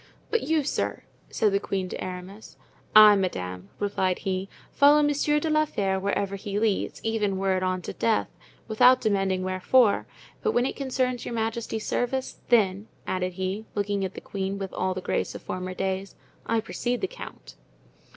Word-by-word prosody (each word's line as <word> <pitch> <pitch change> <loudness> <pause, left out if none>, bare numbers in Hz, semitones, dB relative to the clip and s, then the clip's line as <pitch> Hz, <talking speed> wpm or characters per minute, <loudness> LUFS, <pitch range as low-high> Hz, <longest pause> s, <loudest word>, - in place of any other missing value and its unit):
"But 460 - +2
you, 315 -1 +1
sir?" 275 - -2 0.3
said 215 -2 +2
the 200 - +2
queen 195 -2 -2
to - - -5
Aramis. 185 +3 -8 0.4
"I, 215 -1 +10
madame," 90 - -3
replied 190 -3 0
he, 190 0 -3 0.2
"follow 290 +1 +6
Monsieur 295 +1 +2
de 320 - -2
la 310 0 +3
Fere 195 -8 -1
wherever 200 0 -1
he 200 0 -4
leads, 215 -2 0
even 210 -3 0
were 190 0 +1
it 185 - -1
on 185 -1 -1
to - - -5
death, 225 -2 +1 0.4
without 250 +3 +6
demanding 195 -4 0
wherefore; 195 +5 +3 0.3
but 440 - +1
when 245 - +2
it - - -2
concerns 255 -2 -1
your 235 - -4
majesty's 225 -1 -2
service, 260 +2 -2
then," 205 -3 +3 0.2
added 185 -1 -2
he, 190 +4 -3
looking 205 -1 -1
at 190 -1 -4
the - - -7
queen 195 0 -3
with 195 -1 -5
all 185 0 -1
the 185 - -4
grace - - -2
of - - -8
former 185 0 -4
days, 190 +1 -3 0.3
"I 230 -1 +1
precede 245 +2 -2
the 385 - 0
count." - - -10
200 Hz, 180 wpm, -26 LUFS, 190-240 Hz, 0.4 s, I